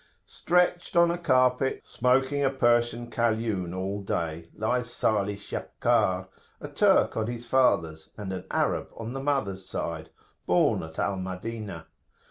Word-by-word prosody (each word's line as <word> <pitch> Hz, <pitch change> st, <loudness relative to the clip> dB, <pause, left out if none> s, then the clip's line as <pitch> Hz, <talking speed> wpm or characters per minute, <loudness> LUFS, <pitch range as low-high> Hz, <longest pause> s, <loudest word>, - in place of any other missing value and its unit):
Stretched 180 Hz, 0 st, +1 dB
on 170 Hz, 0 st, +5 dB
a 170 Hz, -, -2 dB
carpet, 130 Hz, -4 st, +2 dB
smoking 130 Hz, +3 st, +1 dB
a 135 Hz, -, +4 dB
Persian 120 Hz, -2 st, +1 dB
Kaliun 110 Hz, -6 st, 0 dB
all 100 Hz, +2 st, -3 dB
day, 85 Hz, -3 st, -3 dB
lies 120 Hz, +2 st, -1 dB
Salih 105 Hz, -4 st, 0 dB
Shakkar, 95 Hz, -2 st, 0 dB, 0.3 s
a -, -, -7 dB
Turk -, -, +3 dB
on 110 Hz, -1 st, -1 dB
the 120 Hz, 0 st, -3 dB
father's, 85 Hz, -11 st, +1 dB
and 100 Hz, -3 st, -5 dB
an 95 Hz, -, -6 dB
Arab -, -, 0 dB
on 115 Hz, +2 st, -5 dB
the 135 Hz, -, -4 dB
mother's 130 Hz, -10 st, -1 dB
side, 80 Hz, -1 st, -4 dB, 0.4 s
born -, -, +3 dB
at 80 Hz, 0 st, -9 dB
Al 100 Hz, -1 st, 0 dB
Madinah. 95 Hz, -1 st, -6 dB
115 Hz, 140 wpm, -27 LUFS, 95-130 Hz, 0.4 s, on